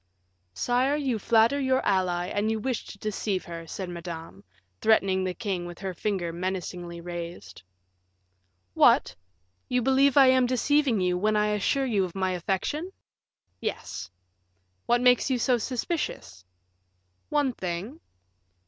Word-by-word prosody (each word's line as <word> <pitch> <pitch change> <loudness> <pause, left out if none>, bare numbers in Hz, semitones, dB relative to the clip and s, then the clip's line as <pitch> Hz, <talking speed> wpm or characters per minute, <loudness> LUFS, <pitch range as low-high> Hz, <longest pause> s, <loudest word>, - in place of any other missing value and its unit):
"Sire, 250 - +1
you 265 -6 -1
flatter 230 +6 +3
your 260 -1 +1
ally, 180 -3 +1
and 205 +3 -1
you 220 - 0
wish 250 +1 -2
to - - -10
deceive 205 -2 -2
her," 165 -1 -8
said 190 +3 -5
Madame, 165 - -8 0.4
threatening 195 -4 +3
the 185 -1 -2
king 190 -6 -3
with 175 -1 -9
her 190 -1 -4
finger 180 -3 -2
menacingly 175 -1 -4
raised. 170 - -7 1.1
"What! - - +4 0.5
you 250 -1 +1
believe 270 +2 +4
I 275 - +9
am 260 -1 +5
deceiving 260 -2 +2
you, 180 0 +1
when 215 +2 +1
I 210 0 +2
assure 210 +7 +1
you 215 -6 +1
of 180 -1 -5
my 190 -1 0
affection?" 195 - -2 0.7
"Yes." - - -5 0.8
"What 240 0 +3
makes 250 +2 +4
you 260 - +2
so 245 +1 +2
suspicious?" 250 - -3 0.9
"One 290 -4 +1
thing." 190 - -5
205 Hz, 140 wpm, -27 LUFS, 180-250 Hz, 1.1 s, I